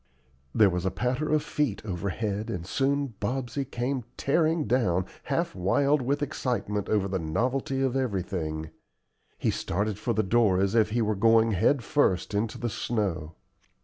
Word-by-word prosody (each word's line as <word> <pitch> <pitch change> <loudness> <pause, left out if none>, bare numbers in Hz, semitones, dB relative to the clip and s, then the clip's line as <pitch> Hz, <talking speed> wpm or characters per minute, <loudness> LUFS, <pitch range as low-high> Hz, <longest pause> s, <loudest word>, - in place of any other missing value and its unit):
There 105 -3 +6
was 90 0 -2
a 95 - +1
patter 125 +8 -1
of 155 -1 +2
feet 130 -10 -2
overhead, 100 +2 -3
and 85 -2 -4
soon 140 +4 0
Bobsey 125 +4 -2
came 125 0 -2
tearing 160 +2 +2
down, 100 -7 +1 0.2
half - - -1
wild 140 +11 +2
with 140 +4 0
excitement 110 -7 -2
over 105 -3 +2
the 95 -1 -2
novelty 125 +11 -1
of 130 -1 0
everything. 90 -10 -2 0.7
He - - +1
started 100 +2 -2
for 120 - -1
the 110 0 +1
door 105 -2 +3
as 100 +1 +1
if 110 -2 +4
he 115 +2 +1
were 110 0 +1
going 115 +2 +4
head 120 +7 +2
first 110 -11 +1
into 105 +2 -1
the 120 - -2
snow. 95 -9 -2
110 Hz, 160 wpm, -27 LUFS, 95-130 Hz, 0.7 s, There